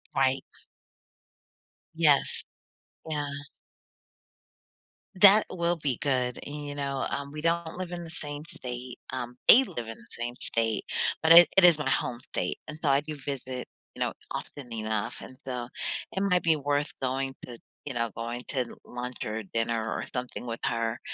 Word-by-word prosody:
Right. 135 -1 +3 1.5
Yes. 150 -4 +3 0.7
Yeah. 150 -2 -1 1.9
That 205 +1 +9
will 170 -1 0
be 140 -6 -1
good, 125 -3 0
you 145 0 -5
know, 140 -1 -1
um, 140 0 -3
we 150 - -6
don't 170 0 0
live 185 -1 -4
in 175 0 -4
the 165 - -8
same 150 -2 -6
state, 125 0 -6
um, 125 -1 -4
they 260 - +10
live 120 - -5
in 115 - -7
the 110 - -17
same 120 +1 -4
state, 115 -3 0 0.4
but 160 - +5
it 170 +1 +11
it 195 - +7
is 170 -4 +8
my 135 - 0
home 125 -2 0
state, 130 - -3
and 155 - -7
so 150 - +2
I 135 0 +5
do 150 0 -6
visit, 130 -2 -4 0.3
you - - -8
know, - - +1 0.2
often 135 -5 -6
enough, 110 -1 -2
and 130 - -11
so, 125 -2 -3 0.4
it 190 - -2
might 180 -3 +3
be 160 -2 +4
worth 145 +1 0
going 135 +1 -1
to 120 -2 -9 0.3
you 145 - -4
know, 115 -1 0
going 120 +1 -4
to 135 - -1
l 120 - -6
lunch 125 0 -5
or 110 +1 -3
dinner 115 +3 0
or - - -2
something 125 -1 -4
with 115 0 -3
her, 115 -1 0
135 Hz, 170 wpm, -28 LUFS, 120-150 Hz, 1.9 s, it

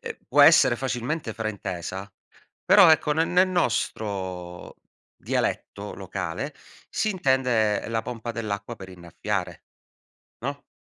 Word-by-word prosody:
ehm, - - -6
può - - +6
essere 120 - +7
facilmente 125 +1 -3
fraintesa, 100 -3 -5 0.5
però - - +8
ecco, 150 -1 +4
ne 160 +2 +2
nel 180 +2 +3
nostro 95 - -2 0.4
dialetto 100 +1 -3
locale, 95 - -5 0.3
si 215 - 0
intende 125 - +1
la 115 -1 -1
pompa 120 -1 -5
dell'acqua 110 0 -4
per 95 -1 -10
innaffiare, 90 +1 -5 0.8
no, 140 +1 -4
110 Hz, 110 wpm, -25 LUFS, 95-130 Hz, 0.8 s, però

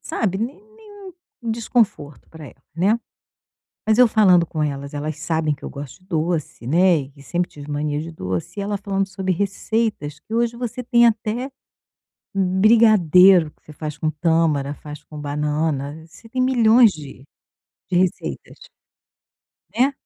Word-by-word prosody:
sabe, 195 -3 -2
né 240 +6 -3 0.2
nenhum 410 -4 -13 0.3
desconforto 220 - -1
para 160 -2 -11
ela 135 - -16
né, 200 +7 +2 0.9
mas 220 +1 +3
eu 250 - +7
falando 185 -6 +4
com 155 -1 -3
elas, 140 -1 -4
elas 150 +1 -4
sabem 160 -2 0
que 145 - -13
eu - - -5
gosto 140 +3 -9
de - - -25
doce, 160 -7 -2
né, 175 +3 +4
e 135 - -7
que 140 0 -18
sempre 175 +4 -2
tive 145 0 -11
mania 145 0 -2
de 165 +2 -6
doce. 95 - -5
E 200 - -2
ela 205 0 -2
falando 195 -1 -2
sobre 190 -1 -2
receitas 200 -5 -2
que 220 - -11
hoje 235 0 0
você 245 +1 -5
tem 235 0 +4
até 230 +3 -1 0.9
brigadeiro 190 -4 +5
que - - -38
você - - -13
faz 150 -1 -6
com 155 - 0
tâmara, 155 -2 +1
faz 150 0 -10
com 150 0 -12
banana, 150 +1 -2
você 225 +7 -17
tem 255 +3 -2
milhões 240 -3 +5
de 145 -5 -11 0.7
de 180 - +1
receitas. 170 - -3 1.1
Né. 260 +4 +3
175 Hz, 160 wpm, -21 LUFS, 150-220 Hz, 1.1 s, eu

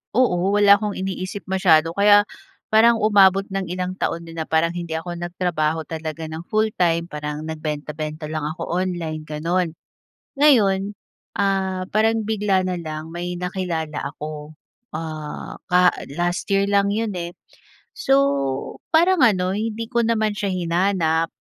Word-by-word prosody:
Oo 195 -5 +2
wala 205 -1 +6
akong 210 -2 -3
iniisip 190 +1 -4
masyado 165 -4 +4
kaya 205 +3 +5 0.5
parang 230 +2 +6
umabot 195 -2 +5
ng 195 0 -1
ilang 180 +1 -3
taon 170 0 -2
din 165 - -10
na - - 0
parang 160 +1 +2
hindi 170 -2 -5
ako 175 +2 -4
nagtrabaho 170 -3 -1
talaga 160 0 -5
ng 160 +1 -7
full-time 180 -6 +1
parang 150 0 -5
nagbenta-benta 155 0 -5
lang 155 -1 -3
ako 160 +3 -5
online 175 -3 -2
gano'n. 165 +3 -1 0.7
Ngayon, 205 -9 +4 0.4
ah, 190 -2 0
parang 225 +1 +2
bigla 205 -3 +1
na 180 -1 -2
lang 155 -1 -6
may 175 +1 -4
nakilala 170 -5 -3
ako. 150 0 -7 0.4
Ah, 155 -1 -6
ka 180 0 +5 0.2
last 175 +1 -1
year 195 0 +3
lang 200 0 +3
'yon, 220 -1 -1
eh. 170 0 -5 0.6
So 425 -11 +2 0.8
parang 345 +1 +4
ano, 185 -4 +2
hindi 225 +1 -3
ko 235 -1 +1
naman 220 -2 +1
siya 200 - -1
hinanap, 170 -2 +1
180 Hz, 140 wpm, -22 LUFS, 160-200 Hz, 0.8 s, wala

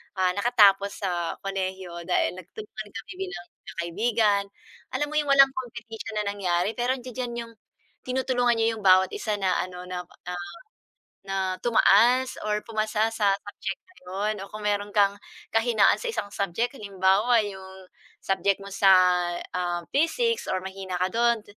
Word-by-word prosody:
ah, 185 -1 +2
nakatapos 200 -2 +3
sa 175 -3 -1
kolehiyo 190 -2 -4
dahil 180 - +2
nagtulungan 210 +3 -9
kami 225 - -7 0.2
bilang 175 - -8
magkakaibigan. 205 +4 0 0.5
Alam 295 +2 0
mo - - -5
'yung 295 - -2
walang 275 -1 +7
competition 235 -4 -7
na 210 - +1
nangyari, 180 0 0
pero 250 +2 0
andiya-diyan 245 -1 -5
'yung 230 - -15 0.5
tinutulungan 250 -2 +1
niyo 225 0 +2
'yung 215 - -10
bawat 185 0 +6
isa 210 -1 -2
na 190 -2 +1
ano 180 0 -8
na 180 -1 -4 0.3
na 180 - -3 0.9
na 195 0 -4 0.2
tumaas 240 +3 +4 0.2
or 210 0 -1
pumasa 215 0 0
sa 205 -3 +2
subject 205 - -6
na 370 - -24
'yon 200 +4 -2
o - - -17
kung 215 0 -8
meron 205 0 0
kang 200 -1 +4 0.4
kahinaan 225 -3 +4
sa - - -4
isang 205 - -3
subject. 200 +6 -1
Halimbawa, 200 +3 +2
'yung 190 -1 -9 0.4
subject 195 0 +1
mo 200 - -8
sa, 195 - +4 0.7
ah, 175 -1 -1
physics 460 - +1
or 185 - -1
mahina 190 -1 -5
ka 185 - +2
dun, 235 -1 +2
205 Hz, 155 wpm, -26 LUFS, 190-235 Hz, 0.9 s, walang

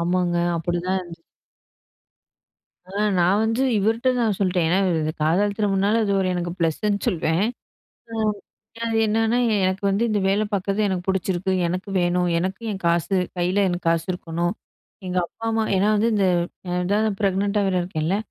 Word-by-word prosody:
ஆமாங்க. 175 0 +1 0.2
அப்படிதான் 175 +3 -1
இருந்துச்சு. 170 -2 -11 1.6
ஆ, 185 - -15 0.3
நான் 185 +4 +3
வந்து 225 +3 0 0.2
இவர்ட்ட 225 +5 +1
தான் 220 -4 +1
சொல்லிட்டேன். 180 -4 +1
ஏன்னா, 180 +3 +2 0.2
இது 155 0 -1
காதல் 200 +6 +2
திருமணம்ன்னால, 205 +1 +2
அது 200 - 0
ஒரு 190 - +1
எனக்கு 175 -1 -2
ப்ளஸ்ஸுன்னு 200 +5 0
சொல்வேன். 170 -3 +1 0.7
அ - - -5 0.7
அது 225 -1 -1
என்னான்னா, 225 +2 +1 0.3
எனக்கு 190 +1 -1
வந்து 200 +4 +1
இந்த 205 -1 +1
வேலை 205 +2 +2
பாக்கறது 200 +1 -1
எனக்கு 180 -1 -3
புடிச்சிருக்கு. 190 0 0
எனக்கு 185 +4 -3
வேணும். 175 0 +1
எனக்கு 190 +4 -3
என் 190 - -7
காசு, 170 +3 +1 0.2
கையில 180 +2 0
எனக்கு 175 -1 -4
காசு 165 0 +1
இருக்கணும். 175 0 -2 0.5
எங்க 180 0 -1
அப்பா, 225 - -12
அம்மா 225 0 +1
ஏன்னா 200 +3 +2
வந்து 220 +3 +2
இந்த 200 -2 +2 0.4
அ - - -2
இதான் 205 +4 +1
நான் 205 -2 -1
ப்ரெக்னன்ட்டா 200 +1 +1
வேற 185 - 0
இருக்கேன்ல, 175 +1 -1
190 Hz, 160 wpm, -23 LUFS, 175-205 Hz, 1.6 s, நான்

